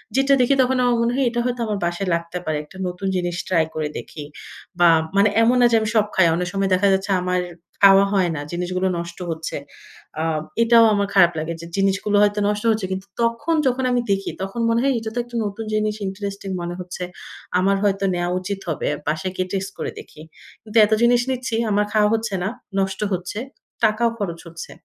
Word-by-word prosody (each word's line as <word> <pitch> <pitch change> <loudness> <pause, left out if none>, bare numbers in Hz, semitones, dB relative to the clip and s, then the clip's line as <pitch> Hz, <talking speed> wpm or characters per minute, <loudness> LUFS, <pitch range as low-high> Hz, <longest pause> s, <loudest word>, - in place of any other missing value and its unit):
যেটা 270 +1 +3
দেখি 250 +3 +3
তখন 255 0 +2
আমার 245 -1 +3
মনে 235 +1 +1
হয় 270 -1 +1
এটা 240 0 -2
হয়তো 245 -1 -2
আমার 210 -2 -2
বাসায় 175 +3 -2
লাগতে 170 +1 -5
পারে। 155 -1 -1
একটা 185 +5 -15
নতুন 180 +2 -4
জিনিস 175 -1 -1
ট্রাই 165 -4 +2
করে 155 -1 -1
দেখি। 150 - -8 0.6
বা, 175 - +6 0.3
মানে 200 +1 +5
এমন 240 +2 +4
না - - +6
যে, - - +4
আমি 215 - -1
সব 210 -1 +4
খাই। 190 - +5
অনেক 180 0 -2
সময় 195 -1 0
দেখা 195 +2 +3
যাচ্ছে 195 +1 -1
আমার 180 0 0 0.4
খাওয়া 195 0 +8
হয় 185 -3 +2
না। 145 - -4
জিনিসগুলো 185 +2 -1
নষ্ট 170 0 -6
হচ্ছে। 160 0 -4 0.6
আ - - 0 0.4
এটাও 230 0 +6
আমার 200 -1 +1
খারাপ 175 -3 +6
লাগে 165 +2 -3
যে, - - -8
জিনিসগুলো 195 +1 +1
হয়তো 205 0 +2
নষ্ট 210 +1 -1
হচ্ছে। 215 -3 -1
কিন্তু 190 +1 -4
তখন 235 +8 +1
যখন 260 +1 0
আমি 245 -1 +2
দেখি, 195 0 0
তখন 195 +5 -4
মনে 230 0 +2
হয় 275 -1 +3
এটা 220 0 -5
তো - - 0
একটা 240 0 -12
নতুন 205 +2 -5
জিনিস, 215 0 0
ইন্টারেস্টিং 200 0 -5
মনে 175 0 -4
হচ্ছে। 180 0 -6 0.6
আমার 195 +1 +2
হয়তো 195 -1 +1
নেয়া 175 0 -1
উচিত 195 +1 -4
হবে। 155 - -2 0.2
বাসায় 180 +5 -1
গিয়ে 185 0 -2
টেস্ট 195 0 -2
করে - - -3
দেখি। 155 - -13 0.4
কিন্তু 220 +1 -3
এত 215 - -6
জিনিস 240 0 +4
নিচ্ছি, 250 -2 -2 0.2
আমার 205 +1 +2
খাওয়া 210 -1 +4
হচ্ছে 225 -2 -1
না, 195 - 0 0.3
নষ্ট 190 0 -1
হচ্ছে, 180 +4 -4 0.4
টাকাও 220 +2 +3
খরচ 170 -5 -4
হচ্ছে। 165 0 -9
195 Hz, 210 wpm, -21 LUFS, 180-225 Hz, 0.6 s, খাওয়া